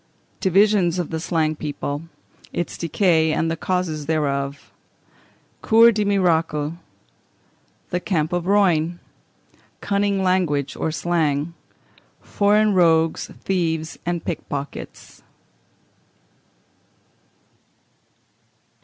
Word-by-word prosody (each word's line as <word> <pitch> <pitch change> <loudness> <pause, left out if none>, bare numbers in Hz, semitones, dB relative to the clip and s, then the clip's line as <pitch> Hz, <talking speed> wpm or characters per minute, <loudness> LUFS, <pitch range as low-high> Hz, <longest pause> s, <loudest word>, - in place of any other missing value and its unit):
Divisions 195 -2 +3
of 175 -2 -3
the 160 - -2
Slang 160 -2 0
People; 145 -1 -4 0.5
its 175 - -3
Decay 165 -2 +2
and 165 +1 0
the - - -1
Causes 165 -3 -2
thereof. 140 -3 -2 0.9
Cours 230 +1 +6
des 210 0 0
Miracles. 165 -6 +1 1.2
The 180 - 0
Camp 170 -4 -1
of 175 -1 -1
Rognes. 175 -4 +2 0.8
Cunning 200 -1 0
Language, 175 -7 0
or - - -2
Slang. 160 -2 -1 0.7
Foreign 210 +1 +2
Rogues, 165 -3 +2
Thieves, 165 -4 -2
and 175 -1 -3
Pickpockets. 145 -3 -6
170 Hz, 85 wpm, -22 LUFS, 155-190 Hz, 1.2 s, Cours